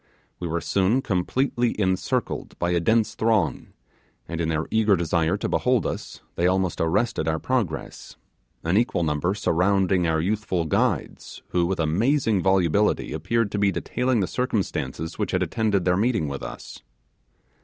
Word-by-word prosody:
We 90 - -3
were 85 +1 -2
soon 100 +10 +1
completely 120 +5 0
encircled 95 -2 -1
by 85 0 0
a 85 - +2
dense 110 +5 +2
throng, 105 - 0 0.6
and 85 0 -4
in 80 - -1
their 80 0 -1
eager 110 -2 +4
desire 85 +1 +1
to - - -2
behold 125 -2 +1
us - - -5
they 85 - +1
almost 95 -1 0
arrested 95 +1 0
our 80 0 +1
progress; 105 -6 -3 0.5
an 85 +4 +1
equal 115 -6 +1
number 80 +5 0
surrounded 95 -1 +2
our 80 -1 +1
youthful 95 -1 -1
guides, 80 - -1
who 85 -1 +1
with 95 0 -2
amazing 110 - +2
volubility 95 +1 +2
appeared 105 +7 0
to 105 - -2
be 100 -1 +3
detailing 125 +2 0
the - - +2
circumstances 95 - -2
which 105 - -1
had 90 0 +2
attended 100 0 0
their 90 0 +3
meeting 110 -6 +1
with 70 -1 -5
us. - - -8
95 Hz, 155 wpm, -24 LUFS, 85-110 Hz, 0.6 s, eager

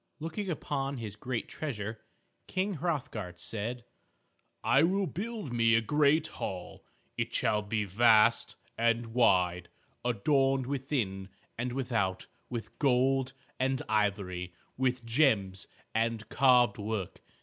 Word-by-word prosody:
Looking 165 +6 -4
upon 140 -4 -2
his 110 -4 -6
great 120 +2 -3
treasure, 110 -7 -5 0.5
King 190 -1 -1
Hrothgar 135 - -3
said, 115 +6 -4 0.8
"I 135 - +4
will 190 +4 +2
build 210 - -5
me 115 -1 +4
a 115 - +4
great 150 +5 +3
hall. 95 - -6 0.4
It - - -1
shall 105 -1 +2
be 105 0 -1
vast 110 +2 +4 0.2
and 115 0 +2
wide, 90 -7 +3 0.3
adorned 135 +3 +2
within 125 -8 -2 0.3
and 120 +2 -2
without 115 -8 -1 0.2
with 115 -3 -6
gold 135 -1 +2 0.3
and 130 0 +1
ivory, 100 -5 -1 0.2
with 125 -2 0
gems 110 -7 +2 0.3
and 115 -1 0
carved 125 -5 +4
work. 105 -3 -4
120 Hz, 115 wpm, -30 LUFS, 105-135 Hz, 0.8 s, I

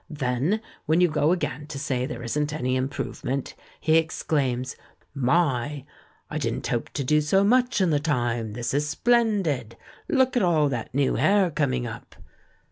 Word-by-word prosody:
Then, 145 - -1 0.3
when 160 +2 +3
you 180 - +5
go 150 +1 +2
again 150 -4 -2
to 150 -2 -6
say 130 -2 -1
there 120 -2 -6
isn't 150 +5 -1
any 130 -4 -1
improvement, 135 0 -3 0.3
he 160 0 +3
exclaims, 140 -5 -1 0.4
'My! 140 -1 +1 0.4
I - - -4
didn't - - -2
hope - - -2
to 140 - -2
do 150 +3 +3
so 190 +7 +3
much 245 +2 +3
in 185 -3 +3
the 145 - +2
time. 120 -7 -1
This 120 +3 -3
is 150 +1 0
splendid. 195 - +1 0.3
Look 260 -4 +2
at 245 - +3
all 160 -5 +3
that 120 -2 -4
new 140 -1 +2
hair 195 -3 +3
coming 130 -5 0
up!' 115 0 -8
145 Hz, 165 wpm, -25 LUFS, 130-170 Hz, 0.4 s, you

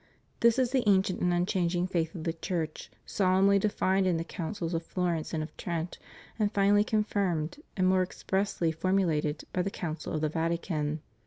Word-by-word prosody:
This 235 +1 +4
is 255 -2 +2
the 260 -1 +3
ancient 190 -2 +3
and 180 - +2
unchanging 175 0 +1
faith 165 -2 -1
of 165 - -5
the 165 - -1
Church, 165 -2 -4 0.2
solemnly 195 +1 +3
defined 190 -2 +1
in 175 -2 +2
the 165 - -2
Councils 170 0 -4
of 165 - 0
Florence 170 -2 -2
and 155 -2 -1
of 155 - -9
Trent, 170 -1 -4 0.4
and 210 -1 +2
finally 205 0 +4
confirmed 200 - -1 0.2
and 185 - +2
more 185 0 +4
expressly 185 -2 -1
formulated 160 -3 0
by 180 - +1
the 190 - -1
Council 165 -4 -5
of 155 - -1
the 155 - +1
Vatican. 160 -2 -1
180 Hz, 175 wpm, -29 LUFS, 165-195 Hz, 0.4 s, This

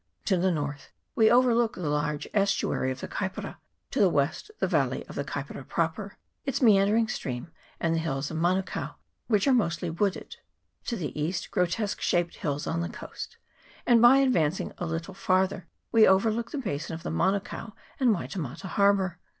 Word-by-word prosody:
To 195 - +3
the 185 +1 +2
north 145 -4 -3 0.2
we 220 -2 +5
overlook 240 -1 +4
the 175 -4 -4
large 150 0 -1
estuary 195 -9 +1
of 130 0 -4
the - - -4
Kaipara; 190 -1 -4 0.3
to - - -1
the 200 -3 +6
west 145 - 0
the - - +1
valley - - 0
of - - -10
the - - -2
Kaipara - - -6
proper, - - -2 0.3
its 275 -3 -1
meandering 215 -1 +4
stream, 125 - -4 0.3
and 165 -1 +1
the 165 - +1
hills 140 -3 -2
of 160 - -3
Manukao, 185 +3 -1 0.3
which 210 -4 +2
are 270 - +5
mostly 175 -7 0
wooded; 195 +3 -2 0.5
to 235 - -2
the 150 - -4
east 175 +4 -2
grotesque 180 +4 0
shaped 175 -1 0
hills 145 -1 -2
on 165 - -1
the 170 - -3
coast; - - -8 0.5
and 235 -2 +5
by 240 +3 +8
advancing 190 - +1
a 175 - -2
little 165 +3 -4
farther 185 -1 0 0.2
we 225 -1 +6
overlook 220 +4 +2
the - - -5
basin 165 - -3
of 165 - -9
the - - -3
Manukao 195 +3 -1 0.3
and 260 -3 +4
Waitemata 170 - -3
harbour. 195 -2 +2
185 Hz, 175 wpm, -27 LUFS, 160-215 Hz, 0.5 s, by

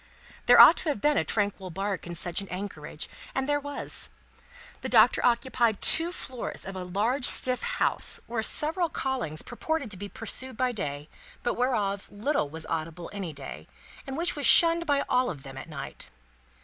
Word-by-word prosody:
There - - +7
ought - - +9
to 325 - -3
have 285 - -2
been 295 +6 +2
a - - +2
tranquil 200 -3 -2
bark 195 0 -4
in 175 - -6
such 175 +2 +1
an 195 - -10
anchorage, 180 -5 -6 0.3
and 265 0 -1
there 290 0 +1
was. 285 0 -1 0.7
The - - -4
Doctor - - +4
occupied 235 -2 +1
two 330 +2 +3
floors 255 -8 -6
of 195 - -7
a 185 - -5
large 220 +9 -1
stiff 255 -1 +6
house, - - +2
where 230 -1 -3
several 320 +9 0
callings 255 - -3
purported 280 0 -4
to 195 - -5
be 200 +2 -7
pursued 240 +3 -4
by 255 0 0
day, 145 -9 -5 0.4
but 240 - 0
whereof 210 -6 -1
little 205 - -1
was 160 +1 -5
audible 165 +1 -5
any 195 -5 -5
day, 140 -2 -10 0.4
and 270 +1 -5
which 340 +1 -1
was 290 - +2
shunned 335 0 +7
by 285 -1 +1
all 250 0 +1
of 140 -6 -8
them 135 -1 -10
at 135 +5 -9
night. 140 -3 -8
220 Hz, 185 wpm, -27 LUFS, 180-270 Hz, 0.7 s, ought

